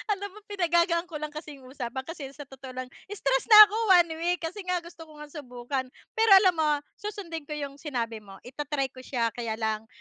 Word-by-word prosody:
alam 405 0 -7
mo, 425 - -13
pinagagaan 345 -2 +1
ko 330 - -10
lang 305 0 -4
kasi 305 -1 -8
'yung 260 -1 -15
usapan 260 -1 -5
kasi 315 -2 -7
sa 290 - -8
totoo 265 -1 -11
lang 255 0 -5 0.3
stress 270 -7 0
na 430 -2 +10
'ko - - -3 0.3
1 335 - -11
week 350 0 -1
kasi 350 +6 -4
nga 360 -1 0
gusto 335 -1 -12
ko 310 - -15
ngang 300 -1 -11
subukan. 255 0 -4 0.3
Pero 450 -2 +2
alam 365 -2 +4
mo, 305 -1 +3 0.3
susundin 340 -7 -6
ko 300 - -4
yung 280 -1 -6
sinabi 235 -7 -3
mo, 195 -2 -13
ita-try 270 +1 -3
ko 255 - -13
siya, 235 -3 -1
kaya 230 -2 -4
lang 220 0 -2
295 Hz, 215 wpm, -27 LUFS, 255-340 Hz, 0.3 s, na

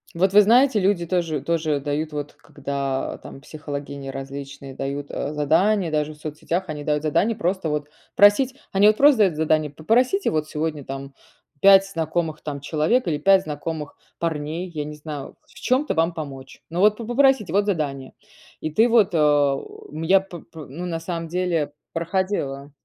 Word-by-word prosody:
Вот 190 +3 +2
вы 210 - +9
знаете, 235 +3 +4
люди 190 -3 +1
тоже 170 -4 -1
тоже - - -19 0.2
тоже 145 -2 +1
дают, 150 +2 -3
вот 145 -1 -5
когда 140 -1 -4
там 135 - -11
психологини 140 -2 -7
различные 135 0 -7
дают, 140 +2 -5
э, 145 - -3
задания, 165 +5 +2
даже 155 0 -1
в - - -19
соцсетях, 155 +4 -3
они 150 -2 -5
дают 150 0 0
задание 195 +9 +1
просто 185 -3 -1
вот 150 -1 -3 0.3
просить 205 +6 +5 0.2
Они 200 +2 +5
вот 215 0 +4
просто 285 -3 +6
дают 190 -6 +4
задание: 155 -1 +1
"Попросите 240 - +1
вот 155 -1 -1
сегодня 155 -1 -3
там 135 +1 -7 0.5
5 195 0 +7
знакомых 160 -3 -2
там 145 -2 -5
человек 155 - 0
или 155 -3 0
5 190 +4 +5
знакомых 150 -1 -5 0.2
парней". 160 +2 -3
Я 150 -2 -3
не 150 +1 -7
знаю: 150 -2 -8
"В - - -23
чём-то 260 +4 0
вам 165 +1 +1
помочь". 135 -4 -9
Ну 170 - -3
вот 210 +2 +4
по 230 - -6
попросите 245 - +2
вот 200 +1 +2
задание. 140 -8 -2 0.5
И 155 - -3
ты 220 +9 +4
вот, 225 -4 +4
э, 145 -3 +3 0.4
я, 190 +4 +4
п 185 -3 -10
пр 160 -1 -12
ну, 170 +7 -6
на 165 -2 -3
самом 165 0 -5
деле 170 -3 -1 0.2
проходила. 165 -5 -2
160 Hz, 175 wpm, -23 LUFS, 145-195 Hz, 0.5 s, вы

